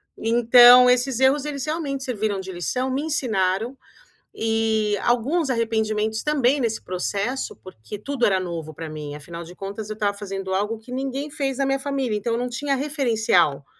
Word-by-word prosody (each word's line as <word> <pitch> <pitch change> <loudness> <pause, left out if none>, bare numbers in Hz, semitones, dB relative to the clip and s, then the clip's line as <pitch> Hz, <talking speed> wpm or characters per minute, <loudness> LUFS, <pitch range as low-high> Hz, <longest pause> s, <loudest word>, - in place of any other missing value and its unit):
Então 240 +2 +7
esses 250 0 +2
erros 270 +2 +3
eles 280 -3 -4
realmente 295 -4 -3
serviram 215 -5 -2
de 190 0 -6
lição, 250 - -2
me 270 - -1
ensinaram, 230 -6 -1 0.6
e 220 -1 +1
alguns 270 +6 +1
arrependimentos 220 -2 0
também 285 -2 +2
nesse 225 -4 -1
processo, 200 +8 -3
porque 185 - -9
tudo 270 +4 -4
era 190 -2 +4
novo 170 -4 -5
para 160 +1 -7
mim, 150 -1 -7
afinal 170 +3 -8
de 175 +2 -12
contas 205 +3 -6
eu 215 - -4
estava 205 -1 -1
fazendo 195 -2 -5
algo 210 +4 -1
que 225 +3 -14
ninguém 270 +3 -3
fez 270 -2 -2
na 275 - +1
minha 270 0 0
família, 270 -5 -2
então 230 +3 -2
eu 230 - 0
não 250 - -1
tinha 275 +3 -1
referencial, 225 - +1
230 Hz, 175 wpm, -23 LUFS, 200-265 Hz, 0.6 s, Então